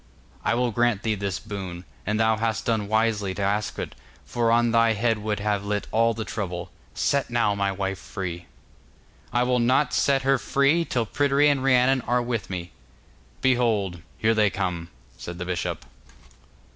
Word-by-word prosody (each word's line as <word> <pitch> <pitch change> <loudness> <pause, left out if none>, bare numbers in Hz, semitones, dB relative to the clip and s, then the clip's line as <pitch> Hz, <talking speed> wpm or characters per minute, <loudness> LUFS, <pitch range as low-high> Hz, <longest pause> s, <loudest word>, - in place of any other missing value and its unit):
'I - - +1
will 125 0 +1
grant 120 -2 +1
thee 110 - +1
this 100 -2 -2
boon; 95 -5 -7 0.2
and 105 +1 0
thou 110 0 +3
hast 110 0 -1
done 110 -3 0
wisely 110 -3 +1
to 100 - -4
ask 105 +2 -1
it, - - -4 0.3
for 115 -1 0
on 120 0 +3
thy 115 0 +4
head 110 +1 +1
would 105 0 -2
have 100 -1 0
lit 105 0 -2
all 115 +1 +3
the 110 0 -4
trouble. 90 -4 -4 0.2
Set 140 -1 +1
now 120 -3 +2
my 100 -1 0
wife 95 -1 -3
free.' 90 -3 -6 0.8
'I 120 +1 +2
will 125 0 +2
not 130 +5 +2
set 135 -1 +2
her 135 0 +3
free 140 +7 +2
till 120 -6 -1
Pryderi 145 +4 +3
and 140 -2 +1
Rhiannon 130 0 +4
are 120 +1 +2
with 120 -3 -3
me.' 90 -2 -5 0.7
'Behold, 110 -9 +1 0.2
here 110 0 +2
they 105 -2 +3
come,' 90 -4 -3 0.3
said 85 0 -7
the 90 - -4
bishop. 90 -1 -3
110 Hz, 175 wpm, -25 LUFS, 100-120 Hz, 0.8 s, thy